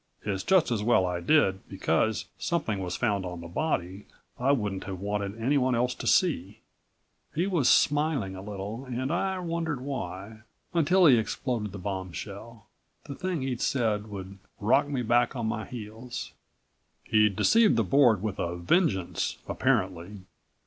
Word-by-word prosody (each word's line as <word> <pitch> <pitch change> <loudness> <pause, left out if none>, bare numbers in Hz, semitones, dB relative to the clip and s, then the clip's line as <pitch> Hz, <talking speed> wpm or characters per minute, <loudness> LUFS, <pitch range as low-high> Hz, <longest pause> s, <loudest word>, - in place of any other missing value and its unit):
It's 100 -2 -2
just 175 - +3
as 110 -3 0
well 105 -4 +3
I 90 -1 -2
did, 95 - +3
because 100 +3 0
something 115 - -1
was 90 -2 -3
found 105 -5 0
on 90 -1 -6
the 85 - -8
body 95 - -2 0.3
I 130 +3 +3
wouldn't 105 -8 -1
have 95 -2 -5
wanted 100 +1 -3
anyone 130 +1 +2
else 125 +1 +1
to - - -6
see." 105 - +2 0.8
He 170 +4 +1
was 175 -10 +2
smiling 145 -10 +2
a 95 - -7
little 105 +4 -6
and 130 +2 -3
I 190 +2 0
wondered 165 -5 -2
why, 110 -6 -6 0.3
until 175 +3 +4
he 135 -6 +7
exploded 110 -1 -2
the 100 - -7
bombshell 100 +4 -6 0.4
the - - -7
thing 180 -2 -3
he'd 125 -2 -3
said 110 -5 0
would 95 -1 -8 0.2
rock 120 +7 +3
me 135 -4 -2
back 120 +3 +2
on 120 -3 -2
my 110 -1 -2
heels. 115 +1 -7 0.7
"He'd 105 -2 +3
deceived 225 - +4
the - - +2
Board 120 -8 +4
with 105 -3 -3
a 85 0 -2
vengeance, 95 - 0
apparently. 95 +2 -1
110 Hz, 155 wpm, -28 LUFS, 95-140 Hz, 0.8 s, he